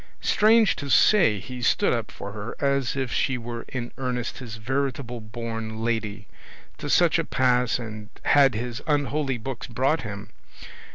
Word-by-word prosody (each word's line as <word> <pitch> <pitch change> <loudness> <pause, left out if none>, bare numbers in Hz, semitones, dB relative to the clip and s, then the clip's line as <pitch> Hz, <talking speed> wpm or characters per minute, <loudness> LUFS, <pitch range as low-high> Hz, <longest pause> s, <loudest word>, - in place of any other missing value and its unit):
Strange 220 0 +4
to 140 - -6
say, 175 - +5
he 125 +5 -7
stood 115 - +3
up - - -2
for 100 - -8
her 105 +2 -6
as 140 -2 +1
if 135 -3 -2
she 130 - +1
were 120 0 -6
in 120 -2 -4
earnest 125 -2 -3
his 115 -4 -7
veritable 130 +1 -2
born 115 0 -5
lady; 105 -3 -2 0.5
to - - -5
such - - +4
a - - +1
pass 125 -2 +2 0.4
had 135 -4 +5
his 120 +3 -4
unholy 145 -2 0
books 120 +1 -6
brought 130 +6 +1
him. 105 -2 -7
125 Hz, 155 wpm, -25 LUFS, 115-135 Hz, 0.5 s, say